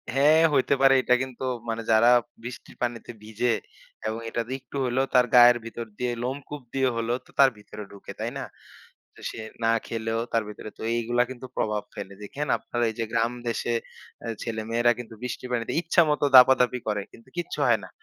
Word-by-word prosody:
হ্যা, 135 - +3 0.3
হইতে 135 0 +3
পারে। 135 0 +7
এটা 125 - +3
কিন্তু 130 -1 -8 0.3
মানে 115 0 -2
যারা 115 +2 +6 0.3
বৃষ্টির 120 0 -9
পানিতে 120 -1 -3
ভিজে 110 +2 0 0.5
এবং 110 +1 -3
এটা 115 - -1 0.2
একটু 130 +2 -14
হইলেও 130 +2 +1
তার 125 -1 +6
গায়ের 120 0 +8
ভিতর 115 0 -6
দিয়ে 125 -1 0
লোমকূপ 140 +3 -5
দিয়ে 135 -1 +2
হলেও 115 +2 -1
তো - - -20
তার 135 -1 +8
ভিতরে 105 0 -10
ঢুকে, 100 - -10
তাই - - -2
না? - - -4 0.9
সে - - -9 0.2
না 115 - +4 0.2
খেলেও 115 0 -2
তার 115 -1 +2
ভেতরে, 105 +1 -8
তো - - -12
এইগুলা 120 +1 +1
কিন্তু 130 0 -8
প্রভাব 105 -1 0
ফেলে। 100 -1 -7
দেখেন 145 +8 -4
আপনার 120 - -6
এইযে 115 +1 -3
গ্রাম 115 +1 +1 0.2
দেশে 120 0 -1 0.5
আ - - -4 0.2
ছেলেমেয়েরা 115 +1 +1
কিন্তু 115 -2 -8
বৃষ্টি 125 0 -5
পানিতে 115 -2 -1
ইচ্ছামত 160 -3 +3
দাপাদাপি 125 -1 +7
করে, 105 -1 0
কিন্তু 115 +3 -17
কিচ্ছু 175 - -4
হয় - - +4
না। - - -9
120 Hz, 180 wpm, -26 LUFS, 115-130 Hz, 0.9 s, গায়ের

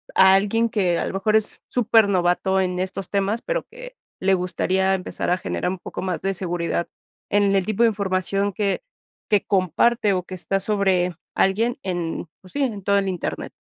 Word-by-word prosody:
a 190 0 +7
alguien 210 +4 +2
que 185 -6 +1
a - - -1
lo - - -4
mejor 215 +3 +1
es 220 -1 +1
supernovato 195 -5 +3
en 180 -1 -1
estos 190 0 -3
temas, 200 +3 0
pero - - -2
que - - -11 0.2
le 195 +1 +2
gustaría 190 +1 0
empezar 185 - -4
a 180 - +3
generar 180 -1 -2
un 190 - -5
poco - - -7
más 185 -2 -3
de 195 0 -1
seguridad 175 -2 -2 0.4
en 200 -1 +3
el 190 -2 +2
tipo 215 +2 +1
de 230 - +6
información 195 -1 -1
que 200 0 -1 0.5
que 205 -2 +3
comparte, 200 +4 +2
o 180 -1 -1
que 185 - -8
está 195 +2 -1
sobre 190 -3 +1 0.2
alguien 225 +6 +1
en 175 -2 -3
pues 185 - -16
sí, 285 - 0
en 215 -7 -3
todo 200 +1 +3
el 200 -1 +1
internet. 180 -3 -4
195 Hz, 190 wpm, -23 LUFS, 185-210 Hz, 0.5 s, a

